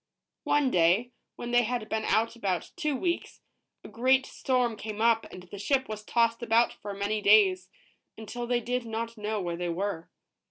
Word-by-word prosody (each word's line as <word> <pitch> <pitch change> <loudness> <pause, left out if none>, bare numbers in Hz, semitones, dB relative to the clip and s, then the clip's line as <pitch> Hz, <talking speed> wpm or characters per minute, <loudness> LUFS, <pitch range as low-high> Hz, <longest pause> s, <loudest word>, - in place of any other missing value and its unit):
One 290 -3 +2
day, 180 +8 +3 0.2
when 240 - -6
they 245 0 +5
had 240 -1 -2
been 220 0 -2
out 225 +3 +1
about 195 -6 -2
two 305 -5 -1
weeks, 345 +5 -2 0.4
a - - -9
great 260 +3 +2
storm 250 -3 0
came 215 0 -7
up, 225 0 +3
and 180 - -10
the 190 +2 -10
ship 265 +4 +1
was 215 -1 -6
tossed 230 +1 +1
about 235 0 +3
for 200 -1 -8
many 205 +2 -1
days, 195 -3 +4 0.5
until 240 +2 -6
they 240 0 +1
did 245 +2 -2
not 230 0 -4
know 215 0 -3
where 175 -3 -3
they 175 0 -3
were. 175 -1 -3
225 Hz, 185 wpm, -28 LUFS, 200-245 Hz, 0.5 s, they